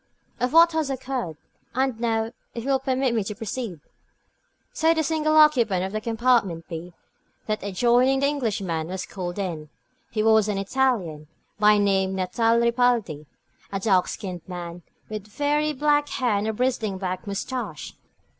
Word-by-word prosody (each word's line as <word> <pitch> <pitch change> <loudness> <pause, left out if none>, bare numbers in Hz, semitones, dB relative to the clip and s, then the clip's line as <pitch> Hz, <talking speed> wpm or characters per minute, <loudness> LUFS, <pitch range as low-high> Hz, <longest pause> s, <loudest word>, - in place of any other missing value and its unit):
"Of 250 0 0
what 335 +1 +7
has 315 -3 -1
occurred. 255 - -3 0.4
And 260 -3 0
now, 225 -1 0 0.2
if 235 - -4
you 275 - -1
will 265 - +3
permit 260 -1 0
me 225 -3 +1
to 210 - -4
proceed?" 220 - -5 0.9
So 325 +1 +3
the 320 - +1
single 310 0 +1
occupant 240 -12 +5
of 190 - -5
the 215 +1 -3
compartment 225 -7 +1
b, 170 +1 -7 0.5
that 215 0 -2
adjoining 240 +7 +2
the - - +3
Englishmen, 200 - -1
was 185 +1 -4
called 180 -2 -6
in. 165 -6 -4 0.4
He 215 - -1
was 220 -1 +4
an 205 -2 -1
Italian, 195 - 0 0.3
by 210 0 +6
name 190 -2 +2
Natale 225 +5 +2
Ripaldi; 235 - +1 0.4
a 195 - -2
dark 190 -3 +3
skinned 185 -4 -5
man, 175 -1 -7 0.3
with 215 -1 -6
very 295 +6 0
black 295 +1 +2
hair 250 -3 0
and 200 +2 -1
a 220 - 0
bristling 225 -4 -1
black 185 0 -4
moustache. 200 - -4
220 Hz, 160 wpm, -24 LUFS, 190-260 Hz, 0.9 s, what